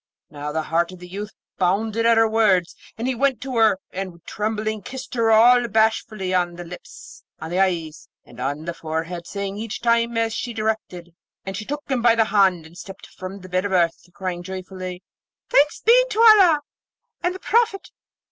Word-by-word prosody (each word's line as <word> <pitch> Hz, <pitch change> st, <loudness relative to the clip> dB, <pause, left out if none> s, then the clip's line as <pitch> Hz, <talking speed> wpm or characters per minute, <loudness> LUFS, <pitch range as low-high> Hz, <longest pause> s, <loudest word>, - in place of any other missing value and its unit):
Now, 150 Hz, 0 st, -5 dB
the 160 Hz, +1 st, -2 dB
heart 170 Hz, +3 st, 0 dB
of 185 Hz, -, -11 dB
the 180 Hz, 0 st, -11 dB
youth 205 Hz, +3 st, -6 dB, 0.3 s
bounded 215 Hz, +5 st, +1 dB
at 230 Hz, -1 st, +5 dB
her 225 Hz, 0 st, +5 dB
words, 205 Hz, -6 st, +2 dB, 0.2 s
and 230 Hz, +3 st, -3 dB
he 260 Hz, -, +1 dB
went 265 Hz, -1 st, +1 dB
to 265 Hz, -1 st, -5 dB
her, 220 Hz, -4 st, +4 dB
and 185 Hz, -2 st, -6 dB
trembling 215 Hz, 0 st, -3 dB
kissed 260 Hz, +6 st, -8 dB
her 230 Hz, -2 st, +1 dB
all 240 Hz, +2 st, +6 dB
bashfully 220 Hz, -3 st, 0 dB
on 175 Hz, -1 st, 0 dB
the 175 Hz, -, -7 dB
lips, 175 Hz, +1 st, -12 dB, 0.2 s
on 160 Hz, -, -7 dB
the 180 Hz, -, 0 dB
eyes, 165 Hz, -5 st, -1 dB, 0.2 s
and -, -, -15 dB
on 145 Hz, +4 st, -3 dB
the 170 Hz, -, -3 dB
forehead, 165 Hz, +2 st, -5 dB
saying 200 Hz, 0 st, -4 dB
each 220 Hz, 0 st, -5 dB
time 235 Hz, 0 st, +1 dB
as 225 Hz, -1 st, 0 dB
she 240 Hz, +1 st, -4 dB
directed. 215 Hz, -6 st, -3 dB, 0.3 s
Then 195 Hz, -, -4 dB
she 210 Hz, +2 st, -6 dB
took 295 Hz, +4 st, -4 dB
him 260 Hz, -3 st, -1 dB
by 230 Hz, -1 st, +5 dB
the 225 Hz, -1 st, +3 dB
hand, 190 Hz, -6 st, +2 dB
and 160 Hz, +2 st, -15 dB
stepped 195 Hz, +2 st, -10 dB
from 185 Hz, +1 st, -9 dB
the 185 Hz, -, -11 dB
bed 185 Hz, 0 st, 0 dB
of 200 Hz, -1 st, -2 dB
earth, 170 Hz, -1 st, 0 dB
crying 180 Hz, -1 st, -4 dB
joyfully, 185 Hz, 0 st, -7 dB, 0.5 s
'Thanks 290 Hz, +1 st, +3 dB
be 485 Hz, +3 st, +6 dB
to 435 Hz, -, -3 dB
Allah 395 Hz, -9 st, +7 dB, 0.6 s
and 360 Hz, +1 st, -1 dB
the -, -, -8 dB
Prophet! 455 Hz, -3 st, 0 dB
200 Hz, 195 wpm, -22 LUFS, 180-230 Hz, 0.6 s, Allah